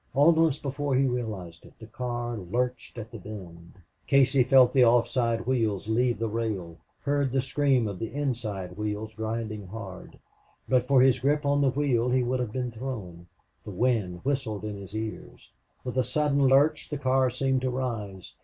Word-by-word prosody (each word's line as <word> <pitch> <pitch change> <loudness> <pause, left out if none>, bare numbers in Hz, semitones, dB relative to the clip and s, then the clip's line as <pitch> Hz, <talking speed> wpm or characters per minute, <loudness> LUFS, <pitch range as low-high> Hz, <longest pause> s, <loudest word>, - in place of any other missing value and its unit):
Almost 160 0 +4
before 140 0 -1
he 135 +1 +3
realized 105 -10 -4
it - - -16
the 110 - -11
car 120 +1 -4
lurched 120 +7 -3
at 115 -1 -7
the 115 - -8
bend. 90 -5 -10 0.3
Casey 135 -1 +4
felt 125 0 +5
the 130 - +6
off 120 0 +4
side 115 -3 0
wheels 110 -6 0
leave 120 +2 +1
the 115 +2 -1
rail, 105 -7 -3 0.2
heard 140 -2 0
the 135 - +1
scream 135 -2 +1
of 100 -3 -5
the 115 - -4
inside 110 -10 -3
wheels 105 +1 -3
grinding 110 -2 -4
hard. 95 -2 -9 0.5
But 125 -1 +2
for 130 -2 +5
his 130 -1 +4
grip 145 +3 +1
on 145 0 +2
the 140 - +4
wheel 125 -3 +1
he 125 0 +2
would 125 +1 -1
have 120 -4 -2
been 125 0 -3
thrown. 110 -9 -7 0.4
The - - -9
wind 100 -4 0
whistled 130 -7 -2
in 105 -1 -4
his 100 +1 -9
ears. 110 0 -7 0.3
With 130 0 -2
a - - +3
sudden 140 -1 +2
lurch 145 +3 +3
the 150 - -3
car 130 -1 +2
seemed 130 +1 0
to 130 - 0
rise. 105 - -4
120 Hz, 180 wpm, -27 LUFS, 105-130 Hz, 0.5 s, the